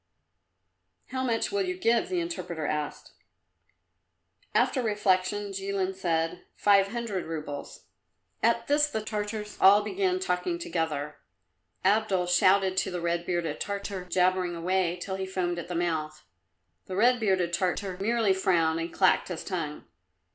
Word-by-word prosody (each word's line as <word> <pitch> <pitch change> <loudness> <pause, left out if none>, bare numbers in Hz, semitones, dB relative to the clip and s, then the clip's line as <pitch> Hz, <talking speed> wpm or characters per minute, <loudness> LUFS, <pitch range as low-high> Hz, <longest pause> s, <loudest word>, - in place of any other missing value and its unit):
"How 260 0 -2
much 230 -3 0
will 405 0 0
you 365 -1 -2
give?" 235 -10 +2
the 360 -1 0
interpreter 175 - -4
asked. 150 -1 -3 1.4
After 260 - +3
reflection 205 -2 +1
Jilin 195 -1 -2
said, 165 -3 -1
"Five 200 -1 +4
hundred 220 -4 -3
roubles." 150 -3 -6 0.6
At 230 +1 +2
this 295 +2 +3
the 220 -7 -3
Tartars 210 0 -4
all 200 +2 +7
began 190 -3 0
talking 185 - -1
together. 155 - -3 0.7
Abdul 200 -2 +2
shouted 185 +1 +3
at - - -5
the 180 - -3
red 170 0 -1
bearded 170 -4 -1
Tartar, 200 -2 -4
jabbering 180 0 +1
away 180 +1 0
till 190 +1 -4
he 190 0 -3
foamed 175 -2 -2
at 170 - -7
the 175 - -4
mouth. 160 -3 -2 0.6
The 185 - -5
red 245 +5 +4
bearded 190 -5 +1
Tartar 185 +1 -1
merely 225 -1 +2
frowned 165 -4 +2
and 165 +1 -4
clacked 185 -1 +3
his 180 -3 -5
tongue. 160 -6 -4
190 Hz, 140 wpm, -28 LUFS, 175-210 Hz, 1.4 s, all